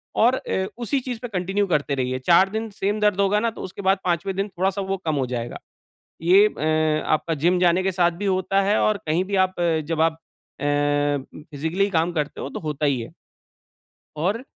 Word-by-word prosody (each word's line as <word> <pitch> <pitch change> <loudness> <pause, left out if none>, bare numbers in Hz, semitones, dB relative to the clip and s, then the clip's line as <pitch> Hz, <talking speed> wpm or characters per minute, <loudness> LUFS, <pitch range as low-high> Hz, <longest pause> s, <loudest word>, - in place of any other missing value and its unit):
और 245 +3 +4
अ, 190 -6 -2
उसी 245 +3 -1
चीज़ 245 -3 -5
पे 245 - -4
कंटिन्यू 195 0 -1
करते 150 -4 0
रहिए, 130 0 -2
4 175 +7 +4
दिन 220 +1 -3
सेम 205 +2 -2
दर्द 210 -2 +2
होगा 200 +1 +3
ना, 230 +2 +1
तो - - -10
उसके 190 +2 -7
बाद 190 0 +3
5वें 185 +2 -1
दिन 195 +1 -1
थोड़ा-सा 190 +2 -1
वो 195 0 -2
कम 155 -2 0
हो 135 -2 0
जाएगा। 120 -1 -4 0.6
ये 190 +5 +6
अ, 155 -2 0
आपका 160 +1 0
जिम 180 +1 +3
जाने 180 +1 +3
के 190 - +1
साथ 175 -1 +2
भी - - -1
होता 195 0 +1
है 205 +2 +2
और 215 -1 +2
कहीं 165 +4 +2
भी 200 +1 -2
आप 185 -1 -14
अ, 165 -2 +2
जब 165 -1 0
आप 165 0 +3 0.5
अ, 145 0 +1 0.3
फिज़िकली 160 +7 -1
काम 170 -1 +1
करते 150 -3 -3
हो 135 - -4
तो - - -6
होता 150 -1 -3
ही 135 -4 +1
है। 115 - -8 1.1
और 200 - -1
180 Hz, 210 wpm, -23 LUFS, 155-200 Hz, 1.1 s, ये